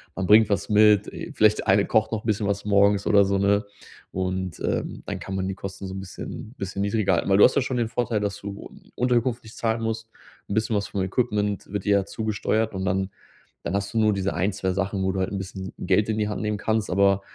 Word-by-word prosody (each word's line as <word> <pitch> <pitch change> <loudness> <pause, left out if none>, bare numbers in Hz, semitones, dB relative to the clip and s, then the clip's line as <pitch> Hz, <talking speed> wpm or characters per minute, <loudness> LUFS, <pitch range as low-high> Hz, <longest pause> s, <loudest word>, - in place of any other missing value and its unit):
Man 95 - -2
bringt 105 +1 +6
was 100 - 0
mit, 105 -1 +5
äh, - - -7
vielleicht 110 0 +4
der - - -5
eine 100 +1 +5
kocht 110 +1 +2
noch 110 -1 -2
'n - - -18
bisschen 105 -1 0
was 100 0 -2
morgens 100 0 +3
oder 100 -1 +6
so, 100 0 +1
ne? 100 +1 +2 0.5
Und, 95 -1 -3
ähm, - - -3
dann - - -4
kann 95 - -5
man 95 0 -1
die 95 - -2
Kosten 100 0 -7
so 95 - -6
'n - - -4
bisschen 105 +5 -8
bisschen 95 0 -4
niedriger 100 -1 +1
halten, 85 - 0
weil 95 - +5
du - - +7
hast 130 - +3
ja 140 - +3
schon 130 0 -2
den 115 -2 +1
Vorteil, 115 -2 -1
dass 100 -1 -2
du 100 0 -7 0.3
Unterkunft 125 -1 +1
nicht 110 - -13
zahlen 115 0 0
musst. 115 0 -3 0.4
'N 100 - -2
bisschen 110 0 +1
was 100 -1 -1
vom 100 - -2
Equipment 105 -1 -1
wird 105 -1 -3
dir 100 -1 +4
ja 95 - -4
zugesteuert, 110 0 -1
und 95 - -3
dann 95 +1 0 0.5
dann 85 - -2
hast 100 +1 -2
du - - -2
nur 110 -1 +4
diese 100 0 -1
ein, 95 +4 0
2 95 -1 -1
Sachen, 95 0 -1
wo 95 - +1
du 95 - -2
halt 95 - -1
'n 100 - -3
bisschen 95 -1 -6
Geld 105 +4 +1
in 110 - 0
die 105 - 0
Hand 105 - -3
nehmen 105 -1 -1
kannst. 110 0 -1
Aber, 100 +1 +3
100 Hz, 255 wpm, -24 LUFS, 95-110 Hz, 0.5 s, du